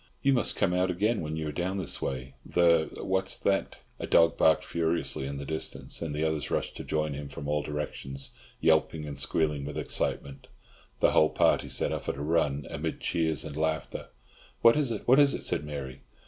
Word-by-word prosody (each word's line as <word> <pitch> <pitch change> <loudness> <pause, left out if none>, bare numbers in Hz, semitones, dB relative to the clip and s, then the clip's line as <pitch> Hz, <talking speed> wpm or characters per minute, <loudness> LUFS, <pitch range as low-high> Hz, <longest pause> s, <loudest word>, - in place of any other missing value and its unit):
"You 140 - +4
must 120 - +1
come 90 - +1
out 90 +1 +2
again 105 +6 +1
when 80 0 -4
you 80 -1 -3
are - - -3
down 90 +5 -2
this 95 - -2
way. 65 0 -4
The—what's 85 +2 +1
that?" 95 0 -1 0.2
A - - -4
dog 85 0 +5
barked 80 - +4
furiously 80 -4 -1
in 70 0 -5
the 70 - -6
distance, 80 +2 -3
and 80 -2 -3
the 75 - -1
others 80 -3 -1
rushed - - -2
to - - -6
join 75 -1 -1
him 70 0 -6
from 70 +1 -7
all 75 0 +1
directions, 70 -2 -5 0.3
yelping 80 -1 +2
and 70 -2 -6
squealing 75 -1 0
with 75 +1 -5
excitement. 70 -1 -3 0.5
The - - +5
whole 80 - +5
party - - +2
set - - -1
off - - -4
at - - -1
a 70 - -4
run, 75 -3 +1
amid - - -3
cheers 80 -5 0
and 70 - -7
laughter. 80 0 -2 0.6
"What 115 0 +8
is 150 -4 +1
it, 110 -3 -4
what 130 +3 +6
is 145 -1 +5
it?" - - -4
said - - 0
Mary. 70 -3 -6
80 Hz, 205 wpm, -28 LUFS, 70-85 Hz, 0.6 s, What